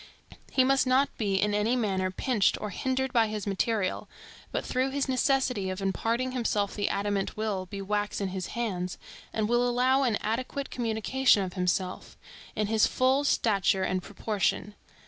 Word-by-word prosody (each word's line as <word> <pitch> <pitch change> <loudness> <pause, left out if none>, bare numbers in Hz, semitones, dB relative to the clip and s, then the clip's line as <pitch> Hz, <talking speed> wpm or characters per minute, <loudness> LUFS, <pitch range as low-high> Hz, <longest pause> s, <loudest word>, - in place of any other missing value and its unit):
He 260 - +4
must 270 0 +3
not 265 +2 +2
be 200 -3 0
in 205 +2 +1
any 210 +4 +2
manner 190 -6 0
pinched 210 +1 +1
or 210 - -4
hindered 260 +5 -1
by 230 -2 +4
his 215 -1 -4
material, 200 0 -1 0.4
but - - -2
through 255 +1 0
his 275 +1 -1
necessity 255 -6 +1
of 185 +1 -4
imparting 230 +6 -1
himself 215 -5 0
the 205 - -1
adamant 200 0 -1
will 205 -4 -2
be 195 +1 -6
wax 205 +1 -1
in 195 -2 -1
his 185 -1 -4
hands, 185 -6 -2 0.3
and 215 -1 -1
will 240 +1 +2
allow 255 +2 +3
an 245 -5 +2
adequate 255 +5 -3
communication 230 -1 +2
of 180 -1 -5
himself, 180 0 -2 0.4
in 215 - 0
his 215 +1 +3
full 260 +2 +2
stature 200 -8 +2
and 185 0 0
proportion. 205 +1 -2
215 Hz, 165 wpm, -28 LUFS, 195-255 Hz, 0.4 s, He